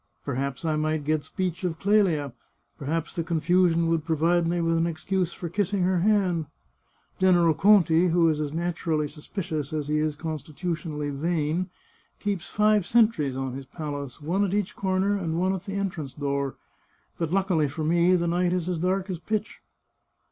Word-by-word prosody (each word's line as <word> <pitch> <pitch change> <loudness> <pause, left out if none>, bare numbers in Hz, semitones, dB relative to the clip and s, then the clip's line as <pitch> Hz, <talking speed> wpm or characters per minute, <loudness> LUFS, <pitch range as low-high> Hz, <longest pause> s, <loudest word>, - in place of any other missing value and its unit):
Perhaps 140 +2 -3
I 155 -1 +1
might 155 0 0
get 155 0 0
speech 185 -3 -3
of 170 -3 -1
Clelia; 180 - +2 0.5
perhaps 160 +3 -2
the 170 - -1
con 165 0 -1
fusion 170 0 +3
would 165 -2 +1
provide 165 +2 +2
me 175 +1 0
with 165 0 +1
an 165 +1 +2
excuse 175 +2 -1
for 175 - -6
kissing 195 +2 0
her 185 0 +2
hand. 185 -5 +2 0.7
General 175 -3 +5
Conti, 175 -1 +5
who 170 -1 +3
is 155 -1 +1
as 150 -2 -2
naturally 165 -2 -1
suspicious 155 -1 -5
as 150 -2 -3
he 150 0 +2
is 155 -1 0
constitutionally 155 -1 -4
vain, 165 +4 -1 0.5
keeps 200 -4 -3
five 210 -1 +3
sentries 215 - +3
on 130 -1 -3
his 135 0 -7
palace, 145 -3 -6
one 175 +7 0
at 200 0 0
each 205 -3 -1
corner 190 +1 +1
and 165 -4 -2
one 185 +1 +2
at 190 -1 -5
the 195 -1 -5
entrance 175 -9 -3
door. 140 -2 -2 0.6
But 165 -2 -1
luck 195 +1 +1
ily 155 -4 +3
for 155 +3 -4
me 170 +3 +4
the 170 -1 +1
night 175 +1 +1
is 180 -2 -1
as 180 -3 -1
dark 185 +2 0
as 175 - -4
pitch." 215 +3 -3
170 Hz, 180 wpm, -26 LUFS, 155-185 Hz, 0.7 s, General